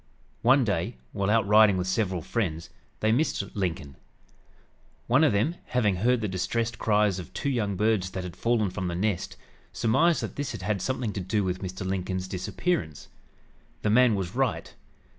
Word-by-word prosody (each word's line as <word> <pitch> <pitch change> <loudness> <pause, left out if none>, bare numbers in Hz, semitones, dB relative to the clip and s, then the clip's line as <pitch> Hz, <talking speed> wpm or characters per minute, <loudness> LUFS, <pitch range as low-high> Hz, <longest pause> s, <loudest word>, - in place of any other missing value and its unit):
One 130 +3 +5
day, 90 - -1
while 100 0 -1
out 110 -1 +3
riding 105 -2 +6
with 90 - -1
several 95 -2 -1
friends, 85 -8 -3 0.3
they 110 - +3
missed 120 -5 0
Lincoln. 85 -8 -3 1.1
One 130 +6 +4
of 150 - +5
them, 145 +13 0
having 105 -7 +1
heard 120 +5 +2
the 105 - -1
distressed 115 +5 -2
cries 105 -3 +2
of 90 - -9
two 140 - -1
young 105 -6 -1
birds 105 -2 +1
that 95 0 -5
had 90 -1 -7
fallen 115 -5 +1
from 95 0 -3
the 85 - -3
nest, 100 0 -2 0.3
surmised 160 +9 +2
that - - -6
this 140 -3 -3
had 100 +1 -2
something 125 -5 -2
to 100 - -3
do 100 +3 0
with 90 -1 -2
Mr. 95 0 -5
Lincoln's 95 0 -2
disappearance. 95 - -3 0.7
The 105 - +2
man 120 -1 +5
was 95 -2 -3
right. 130 -3 -1
105 Hz, 175 wpm, -27 LUFS, 95-115 Hz, 1.1 s, riding